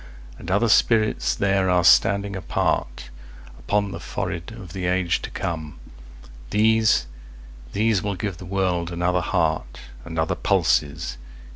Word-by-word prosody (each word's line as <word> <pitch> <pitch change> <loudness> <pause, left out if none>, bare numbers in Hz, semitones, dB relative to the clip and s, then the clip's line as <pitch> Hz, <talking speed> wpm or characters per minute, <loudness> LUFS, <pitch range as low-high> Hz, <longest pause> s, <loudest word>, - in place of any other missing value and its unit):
And - - -8
other 100 +5 +2
spirits 110 0 +3
there 95 -1 +1
are 90 -1 +3
standing 100 +3 +4
apartUpon 60 0 -3
the - - -6
forehead 85 +5 -5
of 100 -7 -10
the 90 -2 -3
age 90 -1 +1
to - - -6
come; 80 -3 -5 0.7
These, 110 - +3 0.7
these 110 -2 +2
will 100 0 -2
give 100 -2 -4
the 90 - -10
world 90 -2 -1
another 90 +1 0
heartAnd 65 -2 -3
other 80 0 +1
pulses. 70 -3 0
90 Hz, 125 wpm, -23 LUFS, 80-100 Hz, 0.7 s, standing